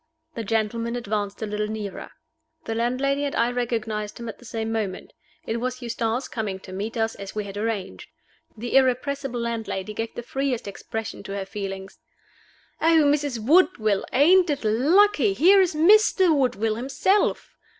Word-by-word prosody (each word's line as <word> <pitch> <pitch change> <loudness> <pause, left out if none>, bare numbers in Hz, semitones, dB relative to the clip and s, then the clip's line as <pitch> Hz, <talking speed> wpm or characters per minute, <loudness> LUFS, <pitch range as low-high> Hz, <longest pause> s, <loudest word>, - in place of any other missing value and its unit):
The 230 - -4
gentleman 225 +2 -1
advanced 210 -3 -3
a - - 0
little 210 0 -2
nearer. 215 -2 -6 0.6
The 225 - -2
landlady 255 +5 0
and 285 - -2
I 235 +1 +2
recognized 225 -4 -3
him 235 - -6
at - - -9
the 245 - -15
same 225 -1 -3
moment. 205 -4 -4 0.3
It 225 - -2
was 255 +1 -3
Eustace 235 +1 -2
coming 205 -4 -4
to 185 - -10
meet 210 +5 -4
us, 225 0 0
as 195 0 -9
we 210 - -2
had 200 -1 -8
arranged. 205 - -4 0.5
The 240 +4 -4
irrepressible 265 0 +1
landlady 225 -4 -3
gave 225 +1 -4
the 240 - -5
freest 265 -3 -2
expression 220 +2 -6
to 195 - -6
her 195 -1 -3
feelings. 195 -1 -6 0.8
"Oh, 325 -1 +5
Mrs. 285 -3 +1
Woodville, 240 - +3
ain't 345 +6 +5
it 285 -3 -1
lucky? 375 - +4
here 390 +3 +6
is 360 -4 +1
Mr. 375 0 +5
Woodville 225 -5 0
himself." 275 - 0
230 Hz, 160 wpm, -24 LUFS, 215-275 Hz, 0.8 s, here